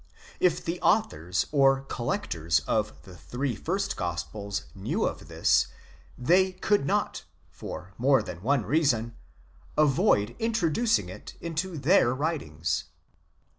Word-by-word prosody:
If 175 -1 +2
the 170 +2 -3
authors 90 - +1
or 135 -2 +4
collectors 105 - -1
of 105 +8 -2
the 90 - -12
three 125 +6 -3
first 195 - -2
gospels 95 +4 -4
knew 95 - -1
of - - -4
this, - - +3 0.5
they 185 +8 +3
could 195 -4 +1
not, - - 0 0.3
for 95 +3 -8
more 135 +2 +4
than 85 0 -8
one 130 0 +1
reason, 120 - +1 0.6
avoid 125 -7 +3
introducing 225 0 +1
it - - -10
into 170 +1 -3
their 140 -4 +4
writings. 80 - -2
135 Hz, 120 wpm, -27 LUFS, 100-170 Hz, 0.6 s, or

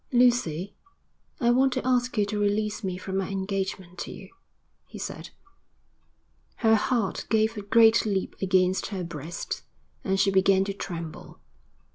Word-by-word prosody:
'Lucy, 240 - +2 0.7
I 240 -3 +3
want 260 +1 +3
to - - -2
ask 250 -1 +1
you 205 - +3
to 210 +1 -3
release 210 +1 0
me 185 -2 -2
from 190 +1 -4
my 195 - -1
engagement 190 -2 -3
to - - -5
you,' - - -10 0.6
he - - -10
said. - - -6 1.4
Her 220 - +6
heart 225 -2 0
gave 220 0 +2
a 210 - -4
great 225 +2 +5
leap 195 -3 -2
against 185 -1 +2
her 190 -4 -4
breast, 165 -1 -5 0.4
and 190 -1 0
she 195 0 +3
began 190 0 +4
to 200 - -3
tremble. 170 -5 -7
200 Hz, 150 wpm, -26 LUFS, 190-220 Hz, 1.4 s, Her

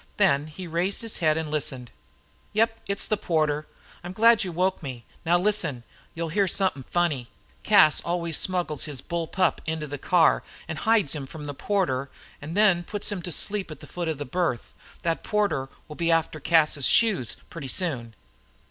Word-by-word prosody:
Then 155 -8 +3
he 170 +4 -8
raised 175 +6 0
his 225 - -1
head 155 -2 +2
and 160 -2 -3
listened. 130 -5 -2 0.6
"Yep, 225 +1 +2
it's 200 0 0
the 215 - 0
porter. 155 -4 0 0.4
I'm 175 +1 -6
glad 230 +2 +5
you 185 - -4
woke 185 +3 0
me. 125 -6 -7 0.2
Now, 175 +1 +5
listen 180 -6 +1
an' 120 - -14 0.3
you'll 165 0 -3
hear 200 +4 +2
somethin' 185 -9 0
funny. 150 -9 0 0.3
Cas 200 -8 +5
always 170 -2 -1
smuggles 175 -6 0
his 145 -4 -3
bull 170 +3 -3
pup 185 0 +1
into 160 -1 -2
the 145 -1 -6
car, 170 +2 +4 0.3
an' 160 - -4
hides 220 -10 +3
him 145 -4 -5
from 150 +1 -9
the 145 - -4
porter, 140 -6 -1 0.3
an' 155 +4 -6
then 200 -4 +4
puts 205 +3 -2
him 200 -3 -3
to 175 - -5
sleep 200 +2 -1
at 155 -3 -9
the - - -11
foot 175 -1 -5
of 160 -2 -1
the 145 - -5
berth. 150 -4 -2 0.3
Thet 165 -1 -1
porter 180 -11 0 0.2
will 150 - -9
be 170 -1 +1
after 160 -1 +1
Cas's 150 -3 +3
shoes 210 - +3
pretty 165 -5 -7
soon." 130 -7 -2
165 Hz, 190 wpm, -25 LUFS, 150-190 Hz, 0.6 s, glad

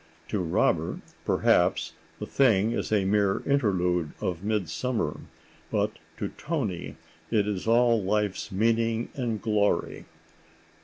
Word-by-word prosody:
To 105 - -1
Robert, 85 -3 +1 0.3
perhaps, - - +2 0.2
the - - -5
thing 115 -5 +3
is 120 - -2
a 100 -3 +2
mere 100 0 +2
interlude 90 - +1
of 90 -1 -3
midsummer, 105 +3 -1 0.5
but - - -1 0.2
to - - -3
Toni 125 - -3 0.3
it 105 -3 +2
is 100 0 -3
all 115 -1 +4
life's 105 +1 -1
meaning 115 +3 +1
and 120 -5 -2
glory. 105 -2 0
105 Hz, 115 wpm, -27 LUFS, 95-115 Hz, 0.5 s, all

